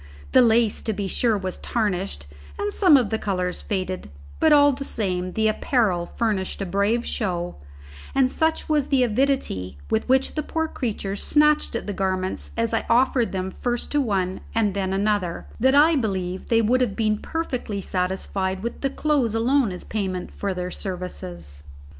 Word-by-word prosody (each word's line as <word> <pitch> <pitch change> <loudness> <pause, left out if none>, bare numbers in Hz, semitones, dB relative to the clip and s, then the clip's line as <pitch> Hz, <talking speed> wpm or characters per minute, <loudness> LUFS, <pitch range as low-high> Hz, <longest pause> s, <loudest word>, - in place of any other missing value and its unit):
The 260 - +7
lace, 230 -2 +3
to 220 - -2
be 200 -1 -3
sure, 225 +2 +1
was 185 -2 -4
tarnished, 195 - -2 0.3
and 205 - -2
some 355 -8 +6
of 240 -5 0
the 220 - 0
colours 180 -3 -2
faded, 185 - -3 0.3
but 315 - +4
all 290 -1 +7
the 275 +1 -4
same 185 -7 -2
the 220 0 +2
apparel 215 -6 +1
furnished 210 -5 -2
a 195 - -2
brave 200 +6 +1
show; 175 - -2 0.6
and 260 -1 +3
such 320 0 0
was 300 -3 +1
the 270 -3 +3
avidity 240 - 0
with 110 - 0
which 265 +1 +3
the 305 - -1
poor 320 +1 -2
creatures 205 -8 -3
snatched 300 -3 +3
at - - -3
the 205 - -3
garments 185 -1 -2
as 230 0 0
I 225 - +1
offered 245 -1 +3
them 190 0 -3
first 240 +2 -2
to 290 - +2
one 190 -6 -1
and 215 -3 +2
then 190 -1 -1
another, 195 -3 0
that 265 +4 +4
I 310 +3 +6
believe 190 -7 -2
they 230 -1 +3
would 250 +4 +3
have 220 -6 0
been 215 -2 +1
perfectly 255 -10 -3
satisfied 190 +1 -2
with 235 - -4
the 275 - +1
clothes 275 -6 0
alone 240 0 +2
as 180 - -6
payment 190 -4 -3
for 200 -2 -3
their 180 0 -3
services. 90 - -6
215 Hz, 175 wpm, -24 LUFS, 185-255 Hz, 0.6 s, The